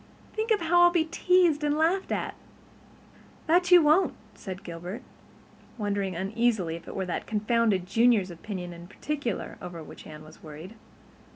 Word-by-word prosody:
Think 440 +1 -2
how 350 +1 +3
I'll 350 - +8
be 345 -2 +1
teased 345 -2 +2
and 295 0 +1
laughed 345 +5 +1
at!" - - -2 1.1
"That 350 +2 +3
you 355 -2 +8
won't," 310 +6 +3 0.2
said 190 -1 -8
Gilbert, 175 +3 -7 0.7
wondering 200 -3 -2
uneasily 195 -2 0
if 170 - -11
it - - -8
were 190 - -2
that 180 - -4
confounded 215 -3 +1
Junior's 210 -1 +3
opinion 175 0 -6
in 170 0 -11
particular 260 +1 -4
over 170 -2 -7
which - - -12
Anne 155 0 -10
was 155 +1 -15
worried. 155 +6 -10
215 Hz, 155 wpm, -27 LUFS, -, 1.1 s, I'll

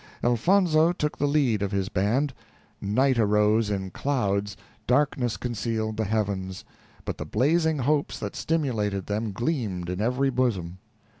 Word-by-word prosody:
Elfonzo 160 - +3
took 150 -4 -3
the 145 - +2
lead 135 -8 +2
of 100 -1 -1
his 100 -2 -1
band. 115 +10 0 0.5
Night 125 +5 +2
arose 105 0 +3
in 95 -2 -3
clouds; 100 -6 -1 0.3
darkness 125 -3 +1
concealed 110 -2 -2
the 110 0 -1
heavens; 100 -3 -2 0.4
but - - -4
the - - -2
blazing 155 - +2
hopes 145 +2 0
that - - -5
stimulated 110 - -1
them 105 +1 -2
gleamed 100 - -2
in 90 +2 -3
every 125 +4 +1
bosom. 95 -9 -1
115 Hz, 140 wpm, -26 LUFS, 100-140 Hz, 0.5 s, Elfonzo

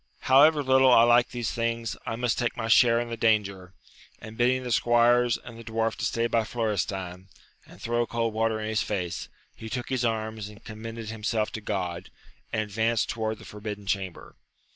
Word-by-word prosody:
However 145 +3 +5
little 130 0 +5
I 115 - +7
like 120 +1 +4
these 120 -1 -3
things, 115 -1 -2
I 115 - -2
must 120 0 -1
take 120 -1 -1
my 115 - -3
share 115 0 +5
in 120 0 -3
the 115 - -3
danger! 100 -5 0 0.4
and 110 0 -10
bidding 125 +2 +2
the 125 - -4
squires 120 +1 +3
and 115 -1 -12
the - - -9
dwarf 115 0 -1
to - - -2
stay 115 0 0
by 115 -1 +1
Florestan, 95 -5 -3 0.4
and 90 - -15
throw 120 +2 -1
cold 115 -1 -1
water 110 0 0
in 110 - -4
his 110 -1 0
face, 90 -4 -3 0.3
he 110 - -9
took 120 +2 -4
his 130 -2 -1
arms 110 -2 -2
and 105 +1 -15
commended 115 0 -7
himself 110 0 -2
to 110 - -6
God, 90 -4 -4 0.4
and 110 - 0
advanced 110 +2 0
towards 110 -1 -2
the - - -14
forbidden 105 -1 -7
chamber. 95 -3 -4
115 Hz, 190 wpm, -26 LUFS, 105-120 Hz, 0.4 s, I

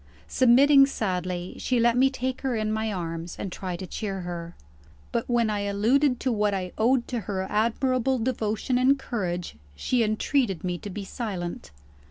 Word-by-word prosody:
Submitting 275 +3 +6
sadly, 180 - -3
she 250 -2 +1
let 235 0 +4
me 265 +2 +5
take 260 -1 -3
her 265 -3 -1
in 215 -1 -1
my 220 0 -1
arms, 165 -2 -4
and 195 - -5
try 180 0 -4
to 185 - -6
cheer 195 +1 -4
her. 170 -1 -6 0.6
But 235 0 -2
when 240 -2 +2
I 205 - -1
alluded 235 +7 +2
to 260 - +1
what 210 -2 +1
I 185 -2 -3
owed 240 +2 +2
to 245 - -1
her 190 -2 -3
admirable 255 +4 +1
devotion 230 0 -1
and 265 +2 +4
courage, 180 - -4 0.2
she 245 - 0
entreated 215 - 0
me 180 -1 -2
to 205 - -7
be 200 +1 -5
silent. 190 - -5
215 Hz, 175 wpm, -26 LUFS, 185-250 Hz, 0.6 s, Submitting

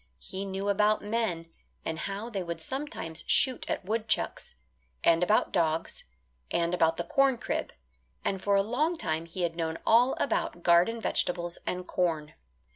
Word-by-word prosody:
He 190 - -6
knew 195 +1 -3
about 210 +1 +3
men, 205 -7 -2 0.3
and 160 0 -3
how 200 +4 -4
they 205 -5 -3
would 170 -1 -4
sometimes 265 - -5
shoot 260 -2 +3
at - - -2
woodchucks; 220 +2 -1 0.5
and 165 0 +5
about 195 +5 +3
dogs, 165 -3 0 0.4
and 170 0 0
about 165 -2 +3
the 170 - -1
corn 270 +7 +3
crib; - - -3 0.5
and 195 -1 -1
for 200 0 +2
a 195 - +4
long 300 - 0
time 160 - -2
he 175 +2 -4
had 165 -1 -1
known 165 -1 -2
all 245 +3 +5
about 175 -9 -1
garden 175 +7 +4
vegetables 175 -5 -1
and 180 0 -3
corn. 160 -4 -1
185 Hz, 160 wpm, -29 LUFS, 170-220 Hz, 0.5 s, and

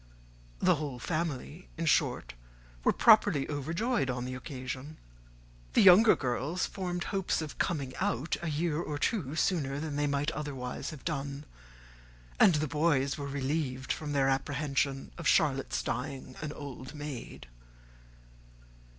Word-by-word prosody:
The - - +3
whole 145 -5 -4
family 155 +3 -3
in 165 - -2
short 150 - +1 0.5
were - - +5
properly 205 -10 +5
overjoyed 165 - -1
on 125 -1 -2
the 130 - -4
occasion. 130 +2 -6 0.8
The - - +5
younger 195 +4 +8
girls 135 +7 -1
formed 180 -2 -3
hopes 195 -2 -1
of 155 -3 -6
coming 140 -7 -1
out 130 +9 0
a 170 - -2
year 155 +1 0
or 150 -4 -3
two 150 - -1
sooner 145 -6 0
than 150 -1 -3
they 145 0 +1
might 145 +2 0
otherwise 140 -5 -4
have 150 -4 -10
done; 140 -2 -3 0.9
and 175 - +7
the 150 +1 0
boys 145 -2 +2
were 140 - -4
relieved 135 -1 -2
from 150 -2 -5
their 135 -1 +3
apprehension 135 0 -1
of 165 - -2
Charlotte's 135 -4 +2
dying 130 0 -4
an 150 -1 -3
old 140 -1 -8
maid. 145 - -7
145 Hz, 140 wpm, -30 LUFS, 135-160 Hz, 0.9 s, younger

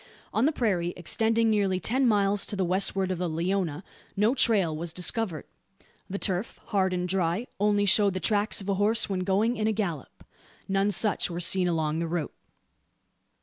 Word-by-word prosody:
On 225 - +2
the 305 - +3
prairie, 190 - -1
extending 225 +5 +1
nearly 195 -3 +1
ten 250 +9 +1
miles 205 -2 +2
to - - -4
the 190 -2 0
westward 190 +1 +1
of 180 - -3
the 180 -1 -1
Leona, 170 0 -2 0.3
no 210 +4 +3
trail 205 - +2
was 165 +2 -3
discovered. 180 -1 -1 0.6
The 195 - -3
turf, 190 +1 -2
hard 190 -3 +1
and 180 0 -2
dry, 180 +3 -1
only 205 0 +2
showed 200 0 +3
the - - -1
tracks 210 +2 +1
of 195 - -9
a 200 - +1
horse 220 0 +2
when 190 - -1
going 200 +6 0
in 215 0 0
a - - +2
gallop. 195 - -4 0.4
None 195 +1 +1
such 205 0 +1
were 170 0 -5
seen 180 +1 +3
along 160 -2 -1
the 170 - -2
route. 165 -3 -3
195 Hz, 185 wpm, -27 LUFS, 175-210 Hz, 0.6 s, the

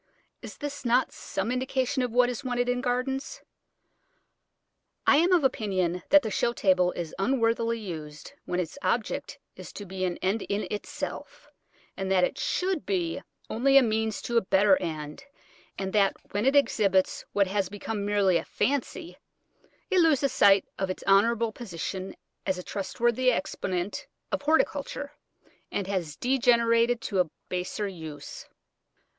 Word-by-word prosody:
Is - - -9 0.3
not 245 +1 +3
this - - -18
some 195 +5 -3
indication 260 +1 0
of 250 - 0
what 245 +1 +4
is 245 +2 -4
wanted 245 -1 -1
in 245 0 0
gardens? 265 - -2 1.6
I - - +6
am 345 +4 +3
of 350 -4 +4
opinion 185 -8 0
that 295 -1 +7
the 220 - -3
show 235 +4 +1
table 185 -4 +3
is 170 -3 -5
unworthily 230 +1 +1
used 155 -8 -8
when 180 - -2
its 180 - -4
object 235 -4 -1 0.2
is - - -10
to 205 - -7
be 190 0 -5
an 175 -1 -2
end 195 +4 0
in 200 +1 -2
itself, - - -6 0.4
and 190 0 -3
that 185 -1 +4
it - - 0
should 365 -3 -1
be 175 -4 -1 0.3
only 270 +4 +3
a 275 - +7
means 220 -1 -1
to 235 - 0
a - - +5
better 190 0 +4
end, 155 - -5 0.5
and 190 -1 -3
that 200 -2 +3 0.2
when 205 +5 0
it 275 - +3
exhibits 200 -9 +2
what 200 -1 +3
has 195 -1 -1
become 205 +1 -4
merely 200 -3 +3
a - - -3
"fancy," 285 +6 -2 0.7
it 375 - +4
loses 295 -5 +3
sight 195 -1 +5
of 190 -1 -1
its 185 - -5
honourable 225 +3 +3
position 190 -3 -6 0.3
as 190 -1 +1
a 180 - -6
trustworthy 240 +6 0
exponent 190 -11 -3 0.2
of - - -1
horticulture, 285 -1 0 0.6
and 200 - -2
has 180 -6 -3
degenerated 235 - +3
to 195 -4 -2
a 180 -3 +2 0.2
baser 180 +3 -2
use. 160 -6 -8
215 Hz, 155 wpm, -27 LUFS, 190-250 Hz, 1.6 s, that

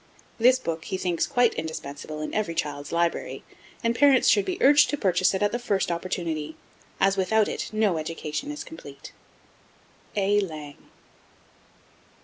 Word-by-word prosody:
This 250 +3 +6
book 165 -9 -4
he 190 - -3
thinks 180 -3 -1
quite 245 -4 +3
indispensable 155 -1 -6
in 155 - -5
every 205 -6 -1
child's 145 -2 -3
library, 170 0 -1 0.4
and 230 0 +1
parents 275 0 +5
should 410 - +4
be 370 -1 -2
urged 290 +2 +6
to 290 - -1
purchase 185 -4 +2
it 190 - 0
at 205 - +2
the 240 - -2
first 200 -7 0
opportunity, 170 -3 -3 0.4
as 195 0 +3
without 210 +3 +2
it - - -4
no 215 -6 +1
education 155 - -4
is 295 0 -5
complete. 320 - -11 1.0
A. 205 0 +2
LANG. 155 -7 -7
190 Hz, 150 wpm, -26 LUFS, 160-230 Hz, 1.0 s, This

